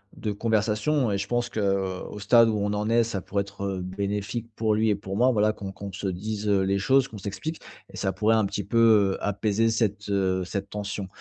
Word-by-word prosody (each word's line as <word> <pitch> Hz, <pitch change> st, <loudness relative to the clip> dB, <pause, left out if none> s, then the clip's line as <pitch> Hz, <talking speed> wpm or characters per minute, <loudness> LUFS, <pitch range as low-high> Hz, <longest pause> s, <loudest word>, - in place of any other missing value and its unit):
de 105 Hz, -, -3 dB
conversation 110 Hz, +5 st, +1 dB
et 100 Hz, -, 0 dB
je 100 Hz, +1 st, -3 dB
pense 120 Hz, +1 st, -1 dB
qu'au 95 Hz, -3 st, -2 dB
stade 115 Hz, +3 st, +5 dB
où 110 Hz, -, 0 dB
on 105 Hz, 0 st, -1 dB
en 105 Hz, +1 st, -1 dB
est 115 Hz, 0 st, +4 dB
ça 110 Hz, -4 st, -3 dB
pourrait 100 Hz, +2 st, -1 dB
être, 100 Hz, 0 st, -6 dB
heu, 95 Hz, -2 st, -2 dB
bénéfique 100 Hz, +4 st, -3 dB
pour 110 Hz, -1 st, +1 dB
lui 110 Hz, +1 st, +2 dB
et 105 Hz, -, +3 dB
pour 95 Hz, 0 st, -6 dB
moi 125 Hz, +3 st, +4 dB
voilà 105 Hz, -2 st, +3 dB
qu'on 100 Hz, -2 st, -7 dB
qu'on 100 Hz, 0 st, -7 dB
se 100 Hz, +2 st, -4 dB
dise, 105 Hz, +3 st, -3 dB
heu, 100 Hz, -2 st, +3 dB
les 95 Hz, +1 st, +1 dB
choses 135 Hz, +6 st, +3 dB
qu'on 110 Hz, -, -9 dB
s'explique. 105 Hz, -, -5 dB, 0.3 s
Et -, -, -10 dB
ça 95 Hz, -, -1 dB
pourrait 110 Hz, +3 st, +2 dB
un 110 Hz, -, +2 dB
petit 100 Hz, +1 st, -3 dB
peu, 110 Hz, +5 st, -2 dB, 0.4 s
heu, -, -, -6 dB
apaiser 105 Hz, +2 st, +1 dB
cette, 105 Hz, -2 st, -1 dB
heu, 95 Hz, -2 st, +1 dB
cette 100 Hz, +2 st, -4 dB
tension. 100 Hz, -1 st, -4 dB
105 Hz, 230 wpm, -26 LUFS, 100-110 Hz, 0.4 s, stade